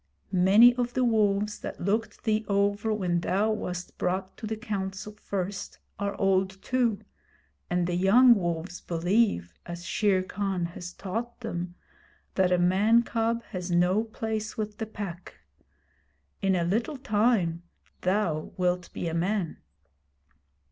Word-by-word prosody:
Many 200 +6 +7
of 245 0 -1
the 255 - +2
wolves 210 -3 +2
that - - -6
looked 215 +5 -1
thee 220 -1 +1
over 200 +2 +1
when 180 -5 0
thou 200 +5 +1
wast 180 -4 -5
brought 185 +1 -1
to 220 - -6
the 220 0 -3
Council 205 -2 -4
first 200 -2 -4 0.2
are 200 0 -2
old 190 0 +1
too, 240 -5 +1 0.7
and 180 0 +1
the 175 - -1
young 215 +8 +6
wolves 175 -3 -3
believe, 175 - +1
as 175 0 -7
Shere 195 -3 +2
Khan 190 -2 -2
has 175 0 -7
taught 230 +6 -5
them, 175 -6 -4 0.6
that 185 -2 +2
a 180 - +4
man 200 +7 +4
cub 230 0 -1
has 180 -2 -4
no 180 +4 +3
place 220 -1 -4
with 210 -1 -4
the 220 - -3
Pack. 190 -5 -7 1.1
In 195 -1 +2
a 175 - +1
little 225 - -1
time 210 -8 +1 0.4
thou 180 -5 0
wilt 180 0 0
be 175 - -3
a 165 - -2
man.' 180 +1 -1
195 Hz, 140 wpm, -28 LUFS, 180-220 Hz, 1.1 s, Many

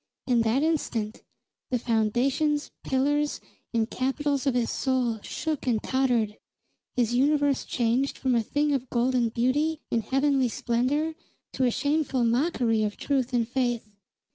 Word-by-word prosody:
In 245 -2 +3
that 230 +5 +2
instant, 235 -9 -1 0.5
the 250 - +1
foundations, 255 +6 +1
pillars, 290 +3 +1 0.3
and 225 -2 +1
capitals 280 +3 -1
of 265 - +2
his 240 -2 +1
soul 250 -4 0
shook 310 +2 -4
and 235 -3 +3
tottered; 245 -5 +1 0.6
his 240 -2 +1
universe 285 +2 +2
changed 245 +3 0
from 260 -2 0
a 235 - +3
thing 290 +6 0
of 260 -2 -2
golden 245 -1 +1
beauty 290 +7 0
and 230 - +2
heavenly 270 +1 +2
splendor 255 +8 0 0.4
to 260 - +1
a - - +4
shameful 285 -1 0
mockery 235 -2 +1
of 210 -1 -1
truth 265 -3 0
and 235 -2 +1
faith. 240 -3 -1
255 Hz, 140 wpm, -27 LUFS, 235-285 Hz, 0.6 s, a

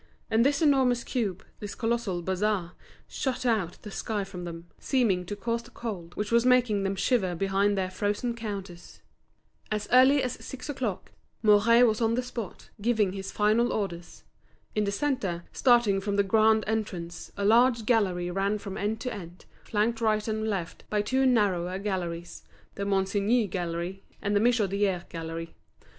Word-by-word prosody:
And 225 +1 +4
this 285 +4 +2
enormous 260 -5 +3
cube, 210 -7 -2
this 205 -1 -6
colossal 225 -6 -1
bazaar, 190 -1 0 0.4
shut 255 -2 -3
out 210 -8 0
the 210 - -8
sky 210 0 -2
from 185 -2 -7
them, 170 0 -7
seeming 205 -10 +1
to 205 - -4
cause 230 +3 -2
the 235 - -16
cold 195 -9 -6
which 210 +1 -3
was 235 0 +4
making 250 -5 +3
them 195 0 -1
shiver 195 -3 +1
behind 195 +2 +1
their 185 -1 -1
frozen 205 +5 -1
counters. 195 -6 -7 0.7
As 210 -1 -2
early 260 +3 +6
as 250 - -4
six 265 +2 -8
o'clock, 245 -9 -3 0.3
Mouret 220 +3 +6
was 220 -1 +1
on 225 0 +2
the 250 - 0
spot, 235 -5 -7
giving 220 -3 +2
his 195 0 -5
final 220 +3 +2
orders. 175 -5 -4 0.5
In 210 -1 +1
the 200 - 0
centre, 200 -8 -1
starting 235 -6 +4
from 200 0 -2
the 200 - +3
grand 220 +2 +4
entrance, 195 -6 -4
a 200 - -1
large 235 +1 +4
gallery 185 -7 +1
ran 195 +3 0
from 195 -2 -7
end 215 +2 -1
to 250 - -3
end, 180 -4 -10 0.2
flanked 225 +2 0
right 215 -1 +1
and 220 0 -1
left 190 -6 -3
by 210 -1 +1
two 260 +4 +2
narrower 190 -7 +2
galleries, 175 -4 -4 0.3
the 200 - -4
Monsigny 200 +3 +1
Gallery 175 +1 -4 0.2
and 205 0 -1
the - - +5
Michodière 200 -5 +1
Gallery. 165 0 -6
210 Hz, 165 wpm, -28 LUFS, 190-230 Hz, 0.7 s, early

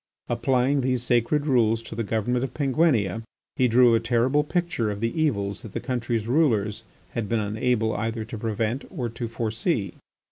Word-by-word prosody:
Applying 135 +2 +2
these 125 -1 0
sacred 125 +5 +1
rules 115 -5 +2
to 115 - -8
the 115 +1 -2
government 115 +4 0
of 130 -2 -5
Penguinia, 130 - +2 0.3
he 130 - +3
drew 120 0 +5
a 115 - +4
terrible 120 +5 +2
picture 170 -8 -1
of 100 -1 -4
the 115 +1 -1
evils 100 -11 0
that 110 - -10
the - - -2
country's 120 -4 -2
rulers 110 -7 +2 0.3
had 115 -4 -3
been 115 - +1
unable 110 +2 0
either 110 +1 -2
to 115 0 -7
prevent 115 +3 -1
or 125 -10 -3
to 115 +1 -5
foresee. 115 - -2
115 Hz, 175 wpm, -25 LUFS, 110-130 Hz, 0.3 s, drew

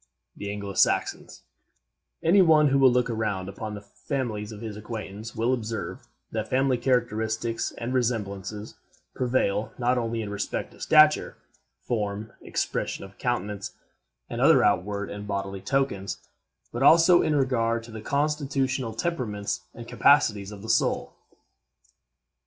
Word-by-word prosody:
THE 100 - -6
ANGLO 100 -1 -5
SAXONS - - 0 0.8
Any 185 +4 +6
one 155 -4 +5
who 135 +1 +3
will 130 -2 +6
look 125 0 +2
around 105 -5 -2
upon 105 +2 -6
the 100 - -8 0.3
families 115 -7 -2
of 105 - -9
his 110 -3 -6
acquaintance 105 0 -7
will 115 +3 +1
observe 115 - -4 0.2
that 110 -1 -3
family 130 -1 +1
characteristics 115 -2 0
and 120 +2 -3
resemblances 105 -4 -2 0.4
prevail 120 -5 0
not 125 0 +1
only 115 -1 -2
in 100 - -6
respect 100 0 -3
to - - -17
stature, 155 -1 +5 0.5
form, 105 -2 -3
expression - - -3
of 95 0 -16
countenance, 105 -5 -2 0.5
and - - -4
other - - +6
outward 100 +2 0
and 105 0 -7
bodily 100 -1 -3
tokens, 105 -4 -1 0.5
but 120 - -4
also 165 +5 +7
in 155 - +1
regard 115 -4 +1
to 115 - -12
the 110 -1 -7
constitutional 135 -3 -1
temperaments 115 -10 -3
and - - -9
capacities 100 -1 +3
of 100 -1 -10
the - - -7
soul. - - +1
115 Hz, 140 wpm, -26 LUFS, 105-130 Hz, 0.8 s, also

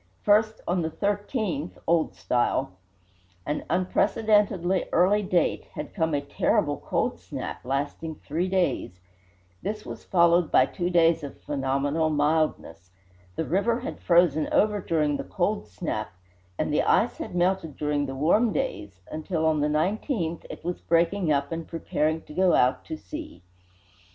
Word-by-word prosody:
First, 215 +1 +3
on 175 +1 +1
the 160 - -1
13th 200 - -2
(Old 165 -1 +1
Style), 120 -5 0 0.7
an 150 - -2
unprecedently 190 +1 +2
early 195 +4 +4
date, 185 -3 0
had - - -6
come 160 -5 0
a 140 - 0
"terrible 140 - 0
cold - - -1
snap," - - -6
lasting 145 +4 -3
three 160 +5 -2
days. 180 - -1 0.6
This 215 0 -4
was - - -8
followed 170 -2 +3
by 130 - +6
two 175 +4 -3
days 165 -2 +4
of 140 - -8
phenomenal 145 +2 0
mildness. 150 - 0 0.5
The 160 - -2
river 230 +9 +1
had 270 - -6
frozen 170 -3 +3
over 210 -1 +2
during 150 -4 +1
the - - -4
"cold 205 +3 -1
snap," 110 - -4 0.5
and - - -1
the - - +3
ice - - +2
had - - -6
melted 175 -3 0
during 150 -1 0
the 135 - -5
warm 190 - +3
days, 100 - -4
until, 160 +1 -2
on 160 -1 +2
the 150 - +2
19th, 170 - -1
it - - -9
was 175 0 -3
breaking 170 +1 +2
up 140 0 0
and 165 0 -4
preparing 160 -1 -1
to - - -12
go 185 +1 +3
out 125 +1 +2
to 315 - -5
sea. 310 - -9
165 Hz, 150 wpm, -26 LUFS, 150-190 Hz, 0.7 s, by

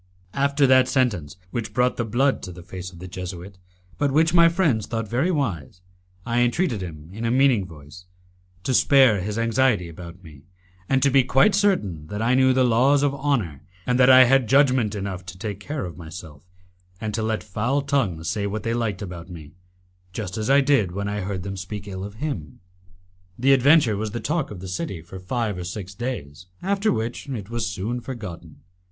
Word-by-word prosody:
After 140 +1 +2
that 130 -1 +5
sentence, 100 - 0
which 110 -3 -4
brought 125 0 +2
the 120 - -1
blood 125 +5 +1
to 90 - -7
the 90 0 -11
face 90 +1 -8
of 90 - -14
the 90 +2 -8
Jesuit, 90 +1 -8 0.4
but 145 -1 +1
which 160 +3 +3
my 170 -1 +7
friends 165 - +1
thought 115 -1 -3
very 130 - 0
wise, 95 - -2 0.5
I 120 +1 0
entreated 120 - +1
him, 80 -3 -8
in 110 +3 -6
a 115 - +1
meaning 125 -6 +3
voice, 75 +2 -13 0.6
to 130 - -1
spare 130 -6 +5
his 105 +3 -4
anxiety 115 -4 +2
about 85 +2 -11
me, 75 -5 -14 0.5
and 135 -1 +2
to 140 - +4
be 135 0 +5
quite 135 +11 +4
certain 140 - +1
that 105 +5 -5
I 115 +3 +2
knew 130 0 +4
the 130 0 +3
laws 130 +4 +3
of 140 -1 +2
honour, 130 - -1 0.2
and 125 0 +1
that 125 0 +6
I 130 0 +9
had 130 -1 +3
judgment 130 -6 +3
enough 95 -2 -4
to 90 - -8
take 100 0 -5
care 145 +4 -4
of 85 - -8
myself, 80 -3 -10 0.6
and 110 -1 -4
to 110 - -1
let 110 0 -1
foul 120 +8 -1
tongues 110 - -1
say 105 -2 -1
what 105 +2 -4
they 115 - -1
liked 110 -4 -2
about 90 -2 -8
me, 80 -5 -10 0.6
just 95 -3 -5
as 110 +2 -3
I 140 +1 +6
did 130 -10 +2
when 100 +1 -3
I 105 0 -2
heard 95 -1 -4
them 95 +1 -5
speak 100 +2 -7
ill 95 -1 -6
of 100 +1 -8
him. 110 - -5 0.8
The 135 +3 +4
adventure 135 -3 +5
was 110 +2 -3
the 120 +3 -5
talk 155 +2 -1
of 95 -4 -9
the 95 - -7
city 95 - -4
for 95 +3 -10
five 105 0 -2
or - - -4
six 95 +2 -6
days, 90 - -6 0.2
after 200 +3 +1
which 115 +5 -3
it 110 -5 -6
was 115 -2 -2
soon 105 +5 -3
forgotten. 115 -10 -8
110 Hz, 205 wpm, -23 LUFS, 95-130 Hz, 0.8 s, I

